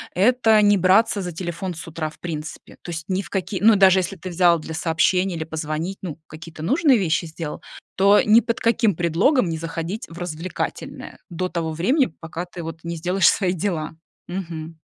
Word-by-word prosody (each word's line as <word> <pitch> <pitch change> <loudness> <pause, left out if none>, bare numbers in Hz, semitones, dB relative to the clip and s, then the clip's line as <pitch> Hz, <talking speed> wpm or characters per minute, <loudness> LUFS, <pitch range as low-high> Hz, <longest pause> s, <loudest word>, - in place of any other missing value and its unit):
это 220 +2 +4
не 205 0 +5
браться 195 +3 +3
за 180 -1 -4
телефон 175 +2 -4
с 165 - -8
утра 160 -1 -4
в - - -18
принципе. 160 -2 -7
То 175 - -6
есть 160 -1 -5
ни 190 +1 0
в 175 - -12
каки 190 0 -3
ну, 220 +1 +6
даже 190 -1 +6
если 185 +2 -3
ты 185 +1 -8
взял 175 -1 +3
для 160 +1 -7
сообщения 175 +3 +1
или 160 - -3
позвонить, 160 +3 -4
ну, 165 -4 -6
какие-то 155 0 -10
нужные 275 - +4
вещи 170 -3 0
сделал, 160 -1 -6 0.3
то 200 +2 +5
ни 215 +2 +6
под 230 -1 -2
каким 230 -5 +2
предлогом 175 - +2
не 160 - -2
заходить 165 +6 -5
в 165 - -11
развлекательное 175 0 -5
до 185 +1 -3
того 165 -2 -3
времени, 250 - +1
пока 165 +2 -5
ты 175 -1 -9
вот 165 0 -7
не 170 0 -4
сделаешь 180 +2 +2
свои 185 -3 +1
дела. 165 -4 -3 0.3
Мгм. 165 -3 -6
175 Hz, 195 wpm, -22 LUFS, 165-195 Hz, 0.3 s, ну